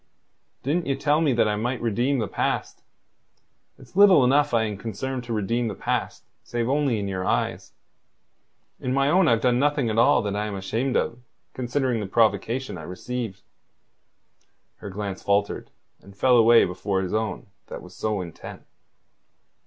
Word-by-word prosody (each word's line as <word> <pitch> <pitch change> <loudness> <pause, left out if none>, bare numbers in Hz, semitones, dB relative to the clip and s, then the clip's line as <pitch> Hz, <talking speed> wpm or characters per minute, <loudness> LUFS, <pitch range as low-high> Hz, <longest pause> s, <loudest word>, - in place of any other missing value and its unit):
Didn't 160 +5 -1
ye 135 - +1
tell 145 +3 +1
me 155 -4 +3
that 115 -2 +2
I 105 - 0
might 120 +3 -2
redeem 120 +5 0
the 110 -4 -1
past? - - -2 1.0
It's 130 +2 -18
little 195 -7 +7
enough 145 +3 +3
I 115 -2 +2
am 105 -2 -3
concerned 115 +5 -5
to 120 - -7
redeem 115 +3 -1
the 105 - -4
past - - -3 0.2
save 120 -1 -2
only 140 -3 +1
in 100 -1 -3
your 95 -1 -3
eyes. - - -2 1.1
In 130 +1 -2
my 140 +1 +2
own 185 -1 +4
I've 115 -5 +3
done 125 0 +2
nothing 145 -4 +1
at 110 - +1
all 115 - +4
that 100 -1 -2
I 105 +1 -2
am 105 - -5
ashamed 115 +7 -2
of, 120 - -2 0.3
considering 125 -1 -1
the 105 - -4
provocation 115 +1 0
I - - -8
received." 100 +4 -6 1.3
Her 100 - -8
glance 100 0 -5
faltered, 100 0 0 0.3
and 100 0 -16
fell 125 +3 +4
away 115 0 +6
before 95 +2 -2
his 95 - -4
own 110 -1 -2 0.2
that - - -8
was - - -13
so 105 -3 -2
intent. 85 -3 -9
115 Hz, 170 wpm, -24 LUFS, 105-130 Hz, 1.3 s, little